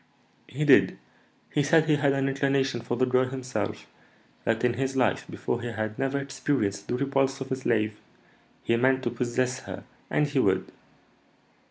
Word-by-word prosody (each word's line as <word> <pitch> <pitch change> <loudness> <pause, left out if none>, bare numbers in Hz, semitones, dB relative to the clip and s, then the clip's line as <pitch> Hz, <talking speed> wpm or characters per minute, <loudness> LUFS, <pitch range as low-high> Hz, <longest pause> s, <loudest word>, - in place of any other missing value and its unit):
"He 150 +4 -2
did. 140 - +5 0.5
He 150 - +2
said 155 +2 +4
he 155 -2 +3
had 140 -1 +2
an 135 0 0
inclination 135 -2 0
for 120 +1 -3
the 130 - +3
girl 130 0 +3
himself; 130 -1 -4 0.6
that 115 +1 0
in 125 -1 +3
his 135 +2 -2
life 125 -3 +1
before 120 - -3
he 120 - -4
had 110 -1 -4
never 135 +1 0
experienced 135 -6 -2
the 125 - -1
repulse 135 0 0
of 135 0 -6
a - - +2
slave; 110 -4 0 0.6
he 115 - +2
meant 130 +2 +2
to 120 - -1
possess 125 +2 -1
her, - - -8 0.3
and 150 - +2
he 145 -2 0
would. 95 -6 +1
130 Hz, 175 wpm, -27 LUFS, 120-135 Hz, 0.6 s, did